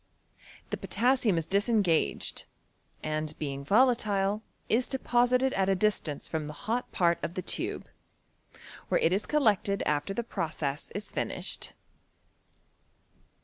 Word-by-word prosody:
The -, -, -1 dB
potassium 245 Hz, -6 st, +2 dB
is 165 Hz, -, 0 dB
disengaged, 195 Hz, -, +1 dB, 0.6 s
and 155 Hz, 0 st, -2 dB
being 140 Hz, -2 st, -4 dB
volatile 210 Hz, -, +3 dB, 0.3 s
is 245 Hz, +3 st, +2 dB
de 265 Hz, -, -1 dB
posited 250 Hz, +1 st, +2 dB
at 190 Hz, 0 st, +1 dB
a 195 Hz, -, +4 dB
distance 185 Hz, -7 st, 0 dB
from 155 Hz, -2 st, -3 dB
the 150 Hz, -, -6 dB
hot 235 Hz, +4 st, -1 dB
part 170 Hz, -1 st, +2 dB
of 170 Hz, -, -3 dB
the 185 Hz, -, -3 dB
tube, -, -, -2 dB, 1.0 s
where -, -, +3 dB
it 165 Hz, -, +3 dB
is 200 Hz, -, -1 dB
collected 210 Hz, -9 st, +2 dB
after 150 Hz, +6 st, 0 dB
the 235 Hz, -, -1 dB
process 155 Hz, -8 st, -3 dB
is 205 Hz, +1 st, -5 dB
fini^ed. -, -, -2 dB
195 Hz, 130 wpm, -29 LUFS, 160-235 Hz, 1.0 s, a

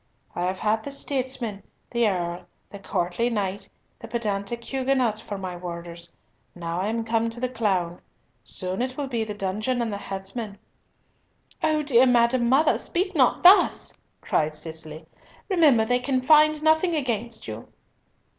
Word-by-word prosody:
I 180 Hz, -, -1 dB
have 185 Hz, +1 st, -2 dB
had 215 Hz, +2 st, +1 dB
the -, -, -5 dB
statesman, 260 Hz, -6 st, -3 dB, 0.3 s
the 235 Hz, -2 st, +2 dB
earl, 175 Hz, -1 st, -3 dB, 0.2 s
the 200 Hz, -, -9 dB
courtly 185 Hz, +4 st, -1 dB
knight, 200 Hz, -4 st, -3 dB, 0.3 s
the 230 Hz, -, -9 dB
pedantic 225 Hz, 0 st, -3 dB
Huguenot, 260 Hz, -4 st, 0 dB
for 205 Hz, -2 st, -6 dB
my 185 Hz, -2 st, -5 dB
warders. 170 Hz, -1 st, -8 dB, 0.5 s
Now 170 Hz, 0 st, -3 dB
am 220 Hz, +4 st, -1 dB
I -, -, -4 dB
come 225 Hz, 0 st, 0 dB
to 230 Hz, +1 st, -7 dB
the 255 Hz, -, 0 dB
clown. 190 Hz, -8 st, -1 dB, 0.4 s
Soon 185 Hz, 0 st, -3 dB
will 255 Hz, +3 st, -2 dB
it 270 Hz, -, -6 dB
be 230 Hz, -2 st, 0 dB
the 210 Hz, -1 st, -5 dB
dungeon 210 Hz, +6 st, -2 dB
and 230 Hz, -3 st, -1 dB
the 200 Hz, -, -4 dB
headsman." 200 Hz, +2 st, -6 dB, 1.0 s
"O 310 Hz, -1 st, +1 dB
dear 260 Hz, -3 st, +5 dB
madam 240 Hz, 0 st, +3 dB
mother, 285 Hz, +5 st, +4 dB
speak 370 Hz, +2 st, -1 dB
not 265 Hz, -7 st, +3 dB
thus," 370 Hz, +3 st, +6 dB, 0.3 s
cried 155 Hz, 0 st, 0 dB
Cicely. 160 Hz, 0 st, -8 dB, 0.4 s
"Remember 300 Hz, -, +4 dB
they 245 Hz, +2 st, +2 dB
can 260 Hz, +1 st, 0 dB
find 305 Hz, 0 st, +5 dB
nothing 315 Hz, +2 st, +3 dB
against 235 Hz, -5 st, -3 dB
you." 110 Hz, +1 st, -7 dB
225 Hz, 155 wpm, -25 LUFS, 190-260 Hz, 1.0 s, thus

